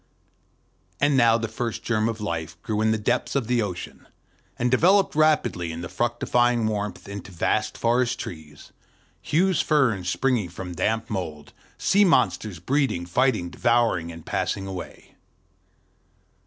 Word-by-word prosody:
And 145 0 +3
now 115 -3 +5
the 115 -1 -3
first 115 0 -4
germ 110 -1 +1
of 115 -1 -4
life 85 -5 -4
grew 110 -1 -1
in 110 - +3
the 110 - +2
depths 105 - -1
of 135 -4 +1
the 120 +1 +1
ocean, 95 -5 -6 0.5
and 125 0 0
developed 185 +9 +4
rapidly 150 - +2
in 80 +1 -6
the 85 - -6
fructifying 120 +3 +1
warmth 105 -3 -3
into 100 0 -8
vast 85 - -1
forest 120 +1 +1
trees, 75 -3 -9 0.5
huge 180 +3 +2
ferns 120 - +2
springing 120 -4 0
from 90 +1 -7
the 90 - -7
damp 110 0 0
mould, 80 -7 -5 0.2
sea 200 +2 +3
monsters 110 - +2
breeding, 130 - 0
fighting, 105 -2 +1
devouring, 115 -8 +1
and 80 -1 -11
passing 95 - -2
away. 95 -2 -8
110 Hz, 145 wpm, -24 LUFS, 90-125 Hz, 0.5 s, now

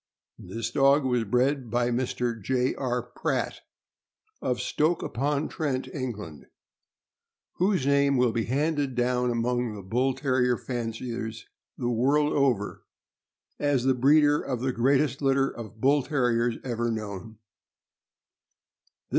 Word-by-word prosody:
This 115 0 -5
dog 140 +1 +4
was 125 -3 +1
bred 125 +3 +1
by 120 +1 +1
Mr. 120 -2 -2
J. 125 +4 0
R. 125 -3 -2
Pratt,' 125 - -3 0.8
of 125 -1 -1
Stoke 160 +3 0
upon 145 +4 -1
Trent, 135 -5 -2
England, 105 - -6 1.1
whose 185 -6 +1
name 140 -1 +3
will 125 -2 +3
be 115 -1 -1
handed 145 0 0
down 125 0 +1
among 120 -1 -1
the 100 - -8
Bull 125 +7 0
Terrier 130 -3 +1
fanciers 115 -2 -5 0.3
the 120 - -2
world 140 +6 +2
over 130 -8 +1 0.8
as 145 -4 +1
the 130 0 +3
breeder 145 +3 +4
of 125 -3 -3
the 130 0 0
greatest 135 +3 +2
litter 135 -1 +2
of 110 -2 -9
Bull 140 +3 +4
Terriers 120 -4 +1
ever 120 -2 -1
known. 110 -1 -5
125 Hz, 125 wpm, -27 LUFS, 120-140 Hz, 1.1 s, dog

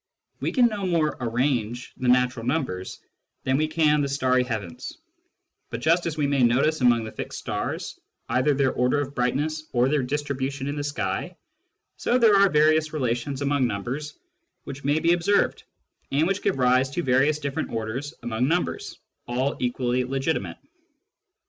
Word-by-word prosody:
We - - -1
can 250 -3 +4
no 210 -4 -1
more 165 -4 +1
" - - -27
arrange 120 -1 -1
" - - -36
the 130 - -2
natural 125 -1 +3
numbers 125 - -3 0.4
than 130 - +1
we 155 +3 +2
can 155 -1 +2
the 140 - 0
starry 130 -2 +2
heavens; 110 -8 -5 0.7
but 115 - -4
just 165 +6 +2
as 160 -2 -4
we 150 - +1
may 140 -1 +1
notice 135 +6 +3
among 120 -2 +4
the 110 - -6
fixed - - -6
stars - - -4 0.3
either 140 +3 +2
their 135 -1 +2
order 125 +3 +1
of 140 -1 -3
brightness 150 +5 -1
or 125 +1 +3
their 150 -1 +2
distribution 140 0 -3
in 145 +1 -3
the 145 - -3
sky, 145 0 -3 0.6
so 245 - +1
there 225 -4 +5
are 200 0 +6
various 155 0 +3
relations 135 0 -2
among 140 -2 +2
numbers 125 +8 -4 0.5
which 140 +1 -8
may 145 +2 +2
be 165 +2 +3
observed, 175 +4 +1 0.5
and 145 +4 +2
which 195 +3 0
give - - 0
rise 130 +1 +3
to 175 +6 -3
various 135 +4 +3
different 145 +1 -3
orders 115 +6 -4
among 120 +2 0
numbers, 175 +4 -1 0.3
all 130 +3 -1
equally 125 0 0
legitimate. 135 +5 -2
140 Hz, 170 wpm, -25 LUFS, 125-155 Hz, 0.7 s, are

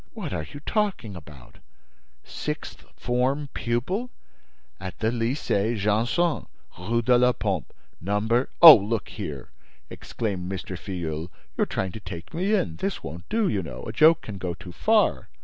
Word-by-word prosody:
"What - - -5
are 75 - -3
you 145 - -8
talking 195 - -1
about? 75 -7 -13 0.6
Sixth - - -6
form 130 +4 0
pupil—" 155 - -2 0.7
"At 95 -1 -7
the 110 0 0
Lycée 115 -2 0
Janson, 115 - +1 0.3
Rue 115 +6 0
de 125 +1 +4
la 125 0 +4
Pompe, 95 - -2 0.3
number—" 110 +7 +1
"Oh, 160 -3 +14
look 105 +2 -2
here," 75 - -7 0.4
exclaimed 95 -5 -4
M. 95 - -2
Filleul, 85 -3 -5 0.3
"you're - - +1
trying 95 -1 -2
to 110 - -8
take 85 -3 -9
me 190 +6 +1
in! 185 - -1
This 195 0 -3
won't 85 +2 -8
do, 225 -2 +1
you 100 - 0
know; 65 -7 -8
a - - -6
joke 160 +1 +6
can 100 -3 -7
go 90 -2 -3
too 90 +1 -10
far!" 85 - +2
110 Hz, 155 wpm, -25 LUFS, 90-130 Hz, 0.7 s, Oh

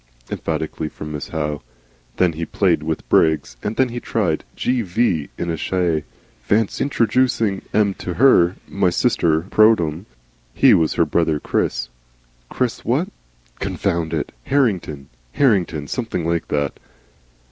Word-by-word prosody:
emphatically 80 - -3
from 75 0 -8
Miss 75 -1 -5
Howe. 75 -2 -3 0.6
Then 90 -2 +3
he 80 +2 -4
played 85 -2 +1
with 80 +1 -4
Briggs, 75 -6 +2
and 105 - -3
then 130 - +3
tried 95 -10 0
the - - -21
'G.V.' 110 - 0
in 85 -1 -2
a - - -1
shay. 85 -2 0 0.4
"Fancy 105 - +1
introducing 115 -5 +1
'em 105 -2 +2
to 90 - -4
her 95 -9 +5
My 100 -2 +1
sister 85 -6 +2
pro 110 +1 +6
tem." 85 +1 -4 0.5
He - - +6
was 80 -2 +2
her - - +3
brother 80 -3 +1
Chris - - -1 0.6
Chris - - -2
what? - - 0 0.5
Confound 85 -2 -1
it! - - -2 0.2
Harringon, 95 - 0 0.3
Hartington 90 - +2
something 100 - -3
like 85 0 -1
that. 70 -1 -2
85 Hz, 135 wpm, -20 LUFS, 80-110 Hz, 0.6 s, pro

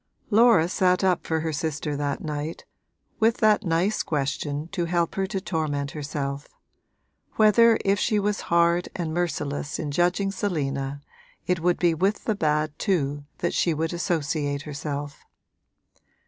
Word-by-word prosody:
Laura 220 -6 +5
sat 180 +1 +2
up 185 -2 +1
for 160 -1 0
her 160 0 -2
sister 150 0 -2
that 140 -1 -2
night, 150 +1 -4 0.5
with 225 +1 +3
that 215 -1 +3
nice 175 +4 +1
question 145 +1 -2
to 175 -2 -2
help 170 0 0
her 195 0 -1
to 195 0 -2
torment 150 -6 -2
herself 140 -1 -4 0.9
whether 225 +1 +6
if 200 +1 +2
she 215 0 +1
was 205 0 0
hard 170 +1 +3
and 165 -3 -3
merciless 145 -4 -2
in 150 -3 -3
judging 180 +5 +1
Selina 140 -8 -2 0.4
it 180 -1 +1
would 175 +1 +2
be 175 -2 +3
with 190 +6 0
the 220 - +1
bad 155 -4 0
too 145 -7 0
that 175 - -1
she 170 -3 +1
would 160 +2 -2
associate 150 -5 -1
herself. 145 -1 -5
165 Hz, 145 wpm, -25 LUFS, 145-190 Hz, 0.9 s, whether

